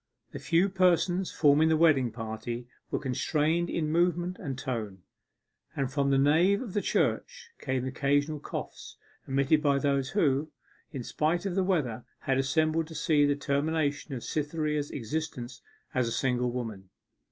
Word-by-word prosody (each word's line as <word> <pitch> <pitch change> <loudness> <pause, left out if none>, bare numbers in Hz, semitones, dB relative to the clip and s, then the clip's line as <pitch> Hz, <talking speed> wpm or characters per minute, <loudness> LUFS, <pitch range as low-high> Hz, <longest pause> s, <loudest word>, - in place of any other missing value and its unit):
The - - -7
few 170 +3 +2
persons 185 -1 +2
forming 150 +1 +4
the 160 - +3
wedding 150 -6 +4
party 115 +2 -5 0.2
were - - -1
constrained 155 +5 0
in 155 -2 -1
movement 175 +2 +1
and 135 -7 -5
tone, 110 -9 -4 0.7
and 135 -2 -2
from 140 -1 +1
the 135 - +3
nave 165 +9 +4
of 230 -8 -6
the 205 - +1
church 470 - -1
came 130 -2 -2
occasional 145 +3 0
coughs, - - -7 0.3
emitted 140 +3 +2
by 140 -2 +3
those 140 -1 0
who, 155 -6 +1 0.4
in 130 - -5
spite 165 +9 0
of 195 - -1
the 190 +1 +1
weather, 140 - 0 0.2
had 135 -1 +1
assembled 155 +4 +1
to 160 - -10
see 150 -1 +3
the 145 - +2
termination 145 +1 -1
of 120 - -6
Cytherea's 150 -1 -2
existence 125 -1 -5 0.3
as 125 -2 +1
a - - -2
single 125 0 0
woman. 110 -6 -5
145 Hz, 155 wpm, -29 LUFS, 130-165 Hz, 0.7 s, forming